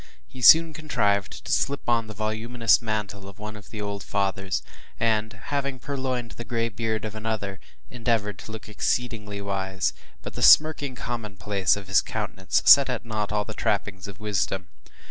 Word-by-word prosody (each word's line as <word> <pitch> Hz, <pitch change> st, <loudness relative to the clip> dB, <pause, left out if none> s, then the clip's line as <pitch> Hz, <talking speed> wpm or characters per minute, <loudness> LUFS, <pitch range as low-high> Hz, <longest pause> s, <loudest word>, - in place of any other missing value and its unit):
He 130 Hz, -, -12 dB
soon 160 Hz, +5 st, +8 dB
contrived 105 Hz, -11 st, -1 dB
to -, -, -4 dB
slip 140 Hz, 0 st, 0 dB
on 115 Hz, -2 st, +2 dB
the 110 Hz, -, -9 dB
voluminous 110 Hz, +2 st, +1 dB
mantle 105 Hz, -3 st, -4 dB
of 100 Hz, -, -14 dB
one 105 Hz, +1 st, -7 dB
of 105 Hz, -2 st, -12 dB
the 110 Hz, -, -7 dB
old 100 Hz, -1 st, -4 dB
fathers, 95 Hz, -2 st, -1 dB, 0.4 s
and 110 Hz, -1 st, +1 dB
having 140 Hz, -2 st, -3 dB
purloined 130 Hz, -3 st, -3 dB
the 120 Hz, -, -8 dB
gray 115 Hz, -1 st, -1 dB
beard 110 Hz, +1 st, -2 dB
of 110 Hz, -, -5 dB
another, 110 Hz, -3 st, -4 dB, 0.3 s
endeavored 115 Hz, -5 st, -1 dB
to -, -, -9 dB
look 110 Hz, -1 st, -8 dB
exceedingly 105 Hz, -2 st, -2 dB
wise; 95 Hz, -3 st, -1 dB, 0.3 s
but -, -, -7 dB
the -, -, -6 dB
smirking 145 Hz, -4 st, +6 dB
commonplace 105 Hz, -5 st, -1 dB
of 100 Hz, -2 st, -9 dB
his 95 Hz, -1 st, +4 dB
countenance 100 Hz, -3 st, -2 dB
set 140 Hz, -1 st, +8 dB
at 125 Hz, -2 st, -3 dB
naught 105 Hz, -2 st, -3 dB
all 105 Hz, -1 st, 0 dB
the -, -, -6 dB
trappings 95 Hz, -2 st, -2 dB
of 100 Hz, +1 st, -10 dB
wisdom. 95 Hz, -3 st, -2 dB
110 Hz, 170 wpm, -25 LUFS, 100-120 Hz, 0.4 s, soon